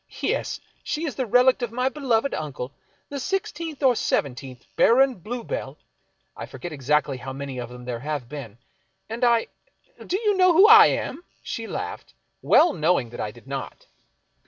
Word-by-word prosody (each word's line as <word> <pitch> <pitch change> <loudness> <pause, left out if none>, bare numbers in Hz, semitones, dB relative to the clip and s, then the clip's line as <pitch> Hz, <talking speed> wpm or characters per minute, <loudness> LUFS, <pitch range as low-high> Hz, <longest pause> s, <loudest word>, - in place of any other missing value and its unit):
Yes. - - -1 0.2
She 315 +3 -3
is 290 - -3
the 250 +2 -3
relict 250 +4 +4
of 240 -2 -2
my 250 +2 0
beloved 265 -2 0
uncle, 140 -4 -5 0.4
the 285 - -5
sixteenth 330 -3 -3
or 255 -2 +5
seventeenth 130 - -2
Baron 265 +3 +5
Bluebell 245 - -5 0.3
— - - -46
I - - -7
forget 175 - -8
exactly 145 0 0
how 130 +2 -7
many 135 -1 -6
of 120 -1 -6
them 125 0 -11
there 120 -2 -4
have 145 -2 -4
been. 125 -6 -8 0.5
And 230 +3 -4
I 235 -1 +4 0.3
— - - -18
do 370 - 0
you 420 -3 +1
know 370 -1 +5
who 380 +6 +7
I 440 -1 +10
am? 310 +6 -3
" - - -39
She 230 -2 -5
laughed, - - -6 0.3
well 340 - +5
knowing 155 -7 +1
that 120 - -9
I - - -2
did 120 +3 -15
not. 135 0 -6
225 Hz, 180 wpm, -24 LUFS, -, 0.5 s, I